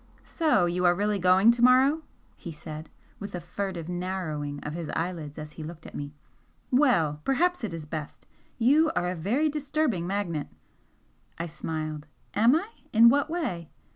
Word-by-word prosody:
"So 305 - +2
you 175 +1 -1
are 175 0 +5
really 205 +1 0
going 185 +5 +6
to 235 0 -2
morrow!" 260 +5 +5 0.3
he 170 - -8
said, 155 0 -8 0.3
with 200 -2 -6
a - - -3
furtive 175 -1 -5
narrowing 175 -5 -3
of 150 - -5
his 165 -2 -5
eyelids 165 -4 -3
as 150 0 -7
he 155 - -8
looked 160 +1 -9
at - - -10
me 145 0 -5 0.6
"Well! 170 - +3
Perhaps 350 +2 +1
it 215 - -2
is 165 -2 -6
best! 150 -1 -7 0.3
You 295 +7 +4
are 180 - +1
a - - -4
very 225 - +1
disturbing 290 - -1
magnet." 180 -7 -2 0.9
I 165 - -3
smiled. 155 -2 -5 0.3
"Am 230 +6 +5
I? 380 +7 -1 0.2
In 230 +1 +8
what 285 +4 +2
way?" 185 - -3
180 Hz, 170 wpm, -27 LUFS, 160-250 Hz, 0.9 s, In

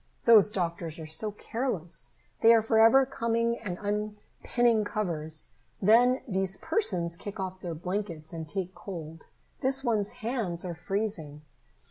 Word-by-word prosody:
"Those 220 -4 +7
doctors 170 -4 -3
are 160 - -7
so 185 +8 -2
careless. 210 -5 -4 0.3
They 230 +1 +8
are 225 - +3
forever 225 +4 +6
coming 230 -2 0
and 185 -5 -5
unpinning 210 +2 0
covers. 160 -8 -2 0.3
Then 240 +6 +4
these 190 -2 -1
persons 175 - +1
kick 205 +3 -8
off 185 0 -4
their 170 -3 -4
blankets 175 -2 -4
and 160 -2 -6
take 185 +3 -3
cold. 165 -5 -8 0.3
This 270 +1 +2
one's 215 -5 0
hands 215 -8 -2
are 175 - -3
freezing." 170 -5 -3
200 Hz, 135 wpm, -29 LUFS, 170-225 Hz, 0.3 s, They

